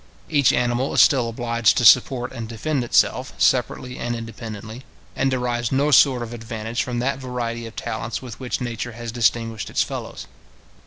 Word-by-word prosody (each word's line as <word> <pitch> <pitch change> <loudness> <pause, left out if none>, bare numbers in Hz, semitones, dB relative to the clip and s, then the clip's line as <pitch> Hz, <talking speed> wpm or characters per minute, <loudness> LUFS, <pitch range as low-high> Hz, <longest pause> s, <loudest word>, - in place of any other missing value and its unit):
Each 145 -4 +4
animal 120 +2 0
is - - +7
still 125 -5 +3
obliged 115 -3 +1
to 120 - +2
support 125 +1 +5
and 115 -3 -7
defend 130 +4 -2
itself, 120 - +1
separately 125 0 0
and 120 0 -2
independently, 115 0 -8 0.3
and 135 - +1
derives 120 -2 -1
no 140 +3 +2
sort 130 -3 +5
of 120 0 -7
advantage 115 0 -4
from 125 -1 -3
that 130 +3 -1
variety 120 -3 -4
of 115 - -12
talents 110 +1 -4
with 125 -4 -10
which 130 0 -3
nature 120 0 -4
has 115 0 -6
distinguished 115 -2 0
its - - +1
fellows. - - -7
120 Hz, 170 wpm, -22 LUFS, 115-125 Hz, 0.3 s, is